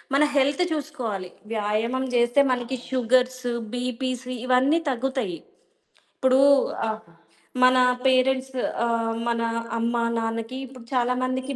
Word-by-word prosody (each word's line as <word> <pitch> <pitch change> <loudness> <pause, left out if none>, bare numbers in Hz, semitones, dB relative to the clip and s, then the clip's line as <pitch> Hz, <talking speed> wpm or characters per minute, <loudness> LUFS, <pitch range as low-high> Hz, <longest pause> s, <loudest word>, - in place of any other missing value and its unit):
మన 280 - +4
హెల్త్ 285 +6 +3
చూసుకోవాలి. 245 - -4 0.2
వ్యాయామం 220 +5 -1
జేస్తే 240 +3 +4
మనకు 250 +1 -2
షుగర్స్, 255 0 +1 0.3
బీపీస్ 250 0 -3 0.2
ఇవన్నీ 260 +5 +3
తగ్గుతయి. 255 -7 -2 0.8
ఇప్పుడూ 260 0 +4 0.5
ఆహ్, 220 0 -4 0.6
మనా 255 0 +5 0.2
పేరెంట్స్ 260 0 +2 0.3
ఆహ్, 230 -1 0
మన 235 0 0 0.4
అమ్మ, 235 +1 0 0.2
నాన్నకి 225 +3 -3
ఇప్పుడు 255 -2 -13
చాలా 250 0 +2
మందికి 260 +2 -2
255 Hz, 110 wpm, -24 LUFS, 230-260 Hz, 0.8 s, మనా